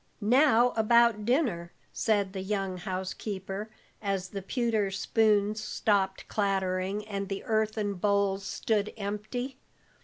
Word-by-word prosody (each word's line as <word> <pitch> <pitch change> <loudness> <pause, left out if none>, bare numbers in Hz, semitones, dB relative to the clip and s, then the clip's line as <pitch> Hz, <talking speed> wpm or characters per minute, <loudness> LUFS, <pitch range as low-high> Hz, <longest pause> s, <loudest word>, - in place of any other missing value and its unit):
"Now 245 +2 +4
about 230 -1 +4
dinner," 225 - +1 0.2
said 205 -4 +1
the 190 - -4
young 195 -1 -2
housekeeper, 190 +2 -4 0.3
as 195 -3 -2
the 195 0 -5
pewter 220 -1 0
spoons 210 +1 +2
stopped 195 -3 0
clattering, 195 0 -1
and 200 -2 -4
the 195 -1 -4
earthen 215 -2 0
bowls 200 0 +1
stood 210 0 -1
empty. 215 +6 -4
205 Hz, 115 wpm, -29 LUFS, 195-220 Hz, 0.3 s, Now